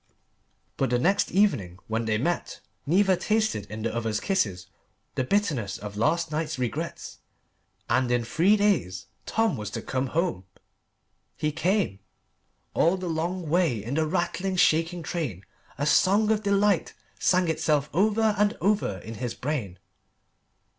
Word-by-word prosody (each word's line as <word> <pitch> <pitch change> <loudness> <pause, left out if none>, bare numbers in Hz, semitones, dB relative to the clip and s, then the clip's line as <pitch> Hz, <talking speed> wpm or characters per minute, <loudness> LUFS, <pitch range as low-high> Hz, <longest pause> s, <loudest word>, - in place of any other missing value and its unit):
But 135 - +1
the 125 - +2
next 185 +11 +2
evening, 135 - +1
when 115 +1 -2
they 110 -1 +1
met, 170 +9 -2 0.3
neither 190 +4 +4
tasted 215 - 0
in 110 +1 -6
the 115 - -1
other's 110 -2 -1
kisses 100 - -1 0.5
the 130 - 0
bitterness 130 - 0
of 105 -1 -8
last 160 +9 +1
night's 155 +1 -2
regrets. 125 -4 -4 0.7
And 125 0 +2
in 120 -1 +1
three 175 - +3
days 165 - +1 0.2
Tom 225 0 +1
was 105 -1 -5
to - - -5
come 130 0 -1
home. 165 - -1 0.9
He 150 -1 0
came. 170 - 0 0.7
All 170 +4 +3
the 185 -1 -5
long 170 +2 -2
way 155 - +1
in 120 +5 -4
the 155 +1 +1
rattling, 185 +2 -1
shaking 165 0 +2
train 125 - -4 0.3
a 145 - -1
song 205 +7 +4
of 215 -1 +1
delight 200 -2 +2 0.2
sang 180 -1 +3
itself 155 -3 +1
over 215 +4 +3
and 210 +1 +2
over 200 - +1
in 110 - -7
his 120 -2 -3
brain. 125 -10 -3
160 Hz, 145 wpm, -26 LUFS, 120-190 Hz, 0.9 s, neither